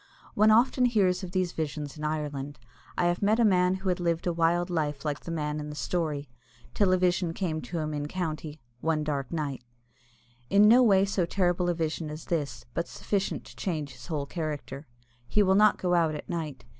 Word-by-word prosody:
One 215 +1 +4
often 245 +3 +4
hears 195 -6 +2
of 185 - -5
these 185 -2 0
visions 150 -3 -4
in 150 - -8
Ireland. 145 -2 -3 0.4
I - - +2
have 175 0 +1
met 215 +3 +3
a 235 - +5
man 180 -2 +3
who 190 0 -3
had 180 - 0
lived 170 -1 0
a 175 - +1
wild 170 +2 +1
life 150 -3 -2
like 150 -1 -1
the - - -10
man 150 -2 -2
in 150 0 -5
the 150 - -7
story, 150 -3 -2 0.5
till 200 -3 +3
a 185 - +4
vision 180 -2 +1
came 160 -5 -2
to 175 - -5
him 155 -1 -2
in 145 0 -3
County 155 -3 -4 0.2
one 160 0 0
dark 140 -3 -3
night 145 -6 -3 0.9
in 205 +1 +6
no 240 +4 +7
way 195 -5 +5
so 195 -3 0
terrible 175 -1 +1
a 175 - +1
vision 160 -1 -2
as 155 +1 -8
this, 140 -8 -3
but 170 - -2
sufficient 195 -2 -2
to - - -13
change 155 -7 -3
his - - -12
whole 150 -4 -2
character. 150 -2 -5 0.4
He 210 - +3
will 190 -1 +3
not 210 +1 +5
go 180 -1 0
out 165 -3 +2
at 150 - -7
night. 155 -8 -5
170 Hz, 210 wpm, -28 LUFS, 150-185 Hz, 0.9 s, no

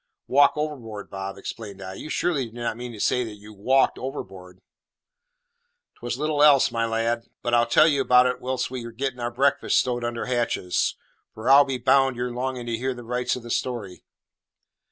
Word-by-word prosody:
"Walk 140 +2 +5
overboard, 125 -9 -5
Bob!" 95 0 -6
exclaimed 100 0 -8
I. 95 - -7
"You 155 - -8
surely 150 -6 0
do 110 - -16
not 120 -2 -3
mean 120 +1 -7
to 110 - -10
say 125 - +1
you 105 -2 -8
walked 130 +7 +2
overboard?" 95 -8 -8 1.4
"'Twas 120 0 -4
little 150 0 0
else, 145 -3 +6
my 115 0 0
lad. 115 +1 -1 0.2
But 120 - -1
I'll 120 0 +4
tell 120 - +5
ye 145 -3 +2
all - - 0
about 125 0 +6
it 125 0 -1
whilst 130 0 -2
we're 120 -2 -5
getting 125 +2 -4
our 120 0 -2
breakfast 135 +4 +1
stowed 120 -1 0
under 120 0 -3
hatches; 120 -7 0 0.4
for 110 +4 0
I'll 140 +1 +8
be 135 -2 -2
bound 135 +2 +3
you're 125 +1 -3
longing 125 0 -3
to 115 -1 -2
hear 130 +2 -2
the 120 - -9
rights 125 +1 -1
of 125 - -8
the 120 - -7
story." 110 -9 -3
120 Hz, 195 wpm, -24 LUFS, 115-130 Hz, 1.4 s, I'll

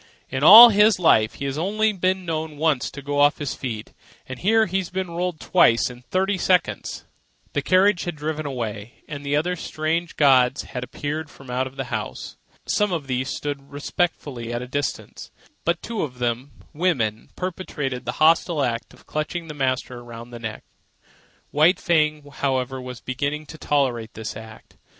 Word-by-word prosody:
"In 130 +1 -2
all 225 +8 +12
his 210 -1 +5
life 110 -11 +3
he's 140 +1 -3
only 215 +5 +1
been 185 0 0
known 160 -2 -3
once 150 -4 +1
to 140 - -10
go 145 +1 -2
off 145 +1 +5
his 145 -3 -3
feet, 110 -5 -6 0.3
and 130 -1 -7
here 220 +3 +3
he's 185 -2 -2
been 185 -1 -3
rolled 175 -1 -2
twice 120 -9 +3
in 125 0 -13
thirty 190 +7 -1
seconds." 180 0 0 0.5
The - - 0
carriage 185 0 +3
had 175 -2 -3
driven 155 0 -3
away, 115 -4 -6
and 145 -1 -7
other 150 +5 +1
strange 165 +1 -2
gods 135 -2 +4
had 125 - -6
appeared 150 +4 -4
from 135 -3 -12
out 130 +1 -2
the - - -3
house. - - -5 0.3
Some 210 -2 +1
of 165 -5 -2
these 130 0 -2
stood 140 -1 -5
respectfully 145 -5 -3
at 120 +1 -3
a - - -8
distance; 145 +3 -4 0.4
but 170 - 0
two 230 -2 -3
of 130 -5 -4
them, 125 +3 -2 0.2
women, 130 -11 0
perpetrated 150 -8 -4
the 125 - -2
hostile 160 -1 +3
act 115 -2 -3
of - - -22
clutching 160 +2 -4
the - - -5
master 130 -3 -2
around 120 0 -10
the 120 - -8
neck. 110 -2 -6 0.9
White 160 +6 +4
Fang, 155 -3 +1
however, 130 -1 -1
was 125 -1 -8
beginning 140 +4 -3
to 160 - -11
tolerate 125 -6 0
this 110 -1 -6
act. 110 0 -12
145 Hz, 170 wpm, -23 LUFS, 125-170 Hz, 0.9 s, all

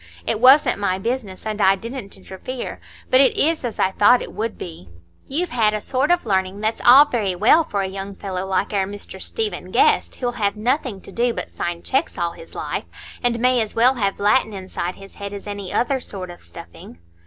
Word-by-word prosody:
It - - 0
wasn't 255 -1 +6
my 185 -2 0
business, 215 -2 -4
and 215 -1 -3
I 190 0 +5
didn't 230 0 -7
interfere; 195 +7 -7 0.3
but 255 - +6
it 275 - +3
is 320 0 +2
as 240 -3 -4
I 190 - +2
thought 240 +6 +4
it - - -9
would 225 +1 -3
be. 160 - -9 0.4
You've 335 +6 -1
had 215 -3 +2
a - - -1
sort 260 +6 -1
of 350 -4 +2
learning 190 -1 0
that's 220 +1 -1
all 265 +4 +9
very 215 -9 -1
well 225 - +5
for 200 -8 -2
a - - -2
young 195 +1 -6
fellow 190 -2 -4
like 190 +2 -1
our 195 -2 +1
Mr 205 0 -8
Stephen 445 -2 -3
Guest, - - +2
who'll 245 -2 -2
have 200 0 +1
nothing 235 -2 -1
to - - -11
do 235 +2 0
but - - -5
sign 175 0 -4
checks 270 +4 -1
all 170 0 -1
his 165 - -14
life, - - -3 0.4
and 240 -1 0
may 250 0 +3
as 220 - -4
well 245 +3 +5
have 200 -6 -1
Latin 210 +1 +2
inside 185 -2 -5
his 195 0 -13
head 200 0 -6
as 200 - -8
any 205 -2 -6
other 265 +2 +1
sort 185 -7 -7
of 175 - -13
stuffing." 85 -1 -12
210 Hz, 215 wpm, -21 LUFS, 190-250 Hz, 0.4 s, all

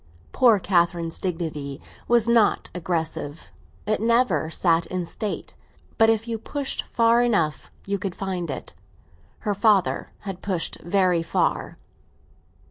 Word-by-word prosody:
Poor 240 -5 +5
Catherine's 170 -3 +1
dignity 155 -6 -3 0.3
was 235 -1 +3
not 235 -3 +3
aggressive; 165 -3 -3 0.3
it 215 0 0
never 225 - +2
sat 165 0 +2
in 180 -1 -3
state; 205 +4 -3 0.5
but 225 0 +6
if 225 0 +1
you 225 -1 -3
pushed 280 +4 -3
far 230 0 +3
enough 185 -11 0 0.2
you 200 0 -1
could 185 -1 -4
find 185 -4 -3
it. 135 - -6 0.7
Her 205 - 0
father 200 -2 +2
had 195 -3 -6
pushed 185 -4 -2
very 180 -1 +2
far. 165 - -1
190 Hz, 125 wpm, -24 LUFS, 170-225 Hz, 0.7 s, but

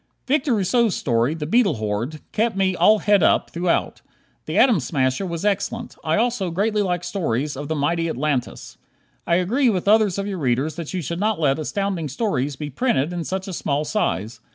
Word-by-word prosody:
Victor 275 -2 +1
Rousseau's 220 +1 +2
story, 120 +4 0
"The 155 -2 -4
Beetle 200 - +3
Horde," 110 +8 -3
kept 225 -1 0
me 190 -1 +1
"all 195 +6 +5
het 205 -2 +3
up" - - +2
throughout. 170 0 -1 0.5
"The - - -2
Atom 235 -9 +5
Smasher" 130 +5 -1
was 170 +2 -4
excellent. 210 +3 -2
I 155 0 +1
also 230 -5 0
greatly 205 +5 0
like 180 -3 -1
stories 150 - -2
of 145 +2 -6
the 160 - -2
mighty 165 +3 0
Atlantis. 140 -3 -3 0.5
I 170 - +3
agree 235 +9 +2
with 190 -3 -1
others 210 -3 +4
of 200 - -2
your 195 -3 -4
readers 135 +3 0
that 165 -2 -6
you 180 - -2
should 170 +4 -4
not 215 -1 0
let 140 -2 +2
Astounding 185 -1 -2
Stories 145 - -1
be 145 +2 -6
printed 170 - 0
in 175 -1 -3
such 190 +1 -3
a 190 - -5
small 150 -2 -1
size. 115 - -2
175 Hz, 195 wpm, -22 LUFS, 145-205 Hz, 0.5 s, all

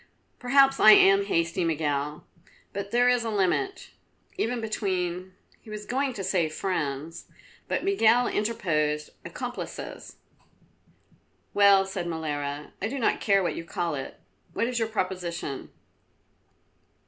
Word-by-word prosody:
"Perhaps 270 +2 +4
I 215 - +9
am 195 0 +6
hasty, 170 -1 0
Miguel, 150 -2 -1 0.5
but 200 0 -4
there 245 +3 +3
is 245 -1 +3
a 230 - -2
limit, 220 - -1 0.4
even 240 +2 -1
between 185 -4 -3
" - - -33
He 225 - -15
was 210 0 -7
going 265 +3 -1
to 200 - -5
say 180 -4 +1
friends 155 -2 -3 0.4
but - - -1
Miguel 245 - +4
interposed 155 -9 -1
accomplices. - - -7 1.4
"Well," 200 -1 +6
said 190 -2 -4
Molara, 150 -3 -4
"I 200 - 0
do 270 +5 -4
not 240 - +1
care 195 -2 +3
what 175 - -1
you - - -5
call 170 -1 -3
it. 135 -2 -6 0.3
What 230 - 0
is 245 0 -2
your 225 - 0
proposition?" 180 -8 -4
190 Hz, 135 wpm, -27 LUFS, 165-225 Hz, 1.4 s, I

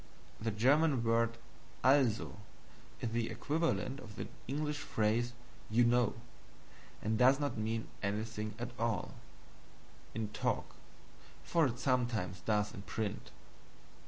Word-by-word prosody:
The 115 - -1
German 135 +5 +4
word 115 0 +2 0.5
ALSO 130 -7 +3 0.6
is 115 - -1
the 115 0 0
equivalent 150 -3 0
of 105 -5 -10
the - - -4 0.2
English 150 +2 -1
phrase 115 0 +1 0.4
"You 115 +3 +4
know," 120 -1 +3 0.9
and 110 +1 +1
does 130 +2 +6
not 145 -1 -1
mean 110 +1 -2
anything 105 +1 -2
at 120 +1 -4
all 115 -1 0 1.0
in 110 -2 -2
TALK, - - -1 0.8
though 170 - +5
it 120 -3 -1
sometimes 120 -8 0
does 105 +3 +1
in 110 - -7
print. 105 0 -3
115 Hz, 120 wpm, -34 LUFS, 110-130 Hz, 1.0 s, does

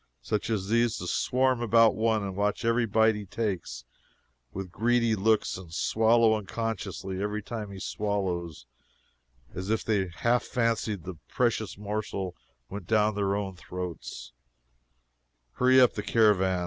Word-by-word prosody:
Such 105 - -2
as 100 -4 -1
these 115 0 +2
to - - -6
swarm 130 +6 +1
about 115 -1 +5
one 110 -1 +1
and 95 -1 -4
watch 105 +2 -1
every 115 0 +2
bite 110 +1 +4
he 105 -2 -7
takes, 100 - -3 0.7
with 95 -2 -6
greedy 115 +2 +2
looks, 110 -1 +1
and 90 -4 -12
swallow 110 +6 +3
unconsciously 100 -3 -4
every 105 +1 -2
time 110 -2 -5
he 100 -1 -8
swallows, 95 - -3 0.9
as 95 +2 -5
if 110 0 0
they 100 -4 +1
half 120 +8 +1
fancied 115 -6 -1
the 90 -4 -8
precious - - -1
morsel 100 -3 -4 0.3
went 100 -3 -8
down 110 0 +3
their 100 0 0
own 100 -2 -3
throats 90 -6 -7 1.2
hurry 130 - +4
up 125 -2 +5
the - - -3
caravan! 95 -5 +3
105 Hz, 145 wpm, -28 LUFS, 95-115 Hz, 1.2 s, about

